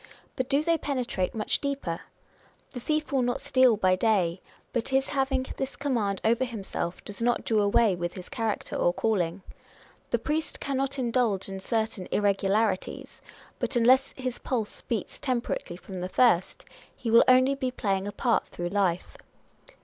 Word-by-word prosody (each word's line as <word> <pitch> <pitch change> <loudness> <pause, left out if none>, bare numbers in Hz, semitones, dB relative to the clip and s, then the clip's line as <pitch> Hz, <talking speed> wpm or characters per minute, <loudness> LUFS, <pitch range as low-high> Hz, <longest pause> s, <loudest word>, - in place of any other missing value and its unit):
But 255 0 -2
do 280 +2 +3
they 335 0 +2
penetrate 250 -10 -2
much 215 - 0
deeper? 275 -13 -2 0.7
The 250 - -6
thief 305 +4 -1
will 270 -2 +2
not 245 0 0
steal 255 -4 +4
by 185 -2 +3
day; 185 -4 +1 0.3
but 235 -2 0
his 270 0 +1
having 270 -2 0
this 270 0 -3
command 230 -9 -1
over 235 +3 +3
himself 205 -7 -4
does 205 +2 -6
not 240 +1 +1
do 220 -2 +2
away 205 0 +3 0.2
his 185 -2 -8
character 225 -2 -3
or 175 - +2
calling. 185 -4 0 0.7
The - - +2
priest 310 +1 -2
cannot 275 0 -1
indulge 235 -6 +1
in 195 0 -5
certain 220 -2 -2
irregularities; 200 0 0 0.4
but - - -1
unless 255 +3 +4
his 255 -2 -4
pulse 230 -5 -3
beats 225 -5 -4
temperately 240 -8 -2
from 185 0 -8
the 180 - -3
first, 210 -6 +2 0.3
he 230 - -3
will 230 - +8
only 255 +2 +6
be 270 -2 -2
playing 195 -6 -1
ja 205 - -3
part 240 -3 +1
through 175 0 -4
life. 185 -3 0
230 Hz, 160 wpm, -27 LUFS, 195-260 Hz, 0.7 s, will